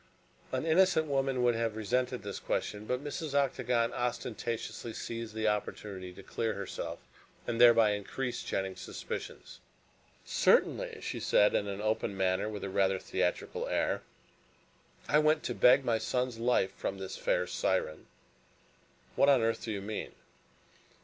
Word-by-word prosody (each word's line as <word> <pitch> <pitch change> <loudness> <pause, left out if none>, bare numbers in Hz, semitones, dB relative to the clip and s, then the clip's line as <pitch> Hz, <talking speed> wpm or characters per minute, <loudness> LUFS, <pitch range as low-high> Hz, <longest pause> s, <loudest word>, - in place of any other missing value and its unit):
An 130 +3 -1
innocent 165 -1 +4
woman 135 -3 0
would 120 -1 +4
have 115 -1 -1
resented 125 +3 -1
this 100 -1 -5
question, 105 +1 -3
but 125 +2 -1
Mrs. 145 0 -4
Octagon 125 -4 +1
ostentatiously 120 -1 -3
seized 115 -1 -5
the 110 0 0
opportunity 100 -3 -3
to 95 - -12
clear 115 +3 -2
herself, 100 -1 -5 0.5
and 120 0 -1
thereby 115 -3 +7
increased 120 +5 -3
Jennings' 95 -1 -2
suspicions. - - -7 0.7
"Certainly," - - +2
she - - -4
said 105 - +4
in 100 - +1
an 100 +1 -4
open 110 -2 -1
manner 95 +1 +1
and 110 - -4
with 105 - -6
a 100 - -3
rather 95 0 +2
theatrical - - -2
air, - - 0 1.1
"I 150 - +4
went 155 0 +3
to - - -2
beg 125 +2 +5
my 115 -2 +2
son's 125 -1 -1
life 115 -5 +2
from 100 - -3
this 95 -1 -6
fair - - +1
siren." 75 0 -1 1.1
"What 140 - +5
on 135 -5 +5
earth 115 0 0
do 115 - -3
you 100 -2 -4
mean?" 105 +1 -5
115 Hz, 150 wpm, -31 LUFS, 105-125 Hz, 1.1 s, thereby